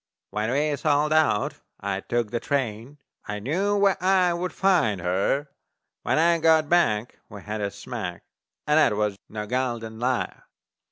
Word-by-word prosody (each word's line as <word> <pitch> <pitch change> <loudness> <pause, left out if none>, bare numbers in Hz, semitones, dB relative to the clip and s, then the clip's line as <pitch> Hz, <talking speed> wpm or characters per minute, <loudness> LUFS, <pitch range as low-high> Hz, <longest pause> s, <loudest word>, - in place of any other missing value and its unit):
When 105 +2 -1
we 145 +3 +1
sold 150 +1 +2
out 155 -9 +2 0.2
I 100 -1 -2
took 120 +1 -2
the 120 - -1
train, 130 -1 -3 0.3
I 105 - -3
knew 185 - 0
where 195 -2 +2
I 185 -2 +4
would 180 +1 -3
find 165 - +2
her; 95 +11 0 0.5
When - - 0
I 170 +1 +4
got 160 -1 +4
back 125 -10 +1
we 100 -2 -10
had 105 0 -4
a 100 - -1
smack - - -6 0.4
And 150 +1 +4
that 150 - +4
was 105 -1 0
no 105 -1 -5
gol 125 +1 -1
darned 110 -1 -9
liar. 125 +1 -2
130 Hz, 165 wpm, -25 LUFS, 105-160 Hz, 0.5 s, I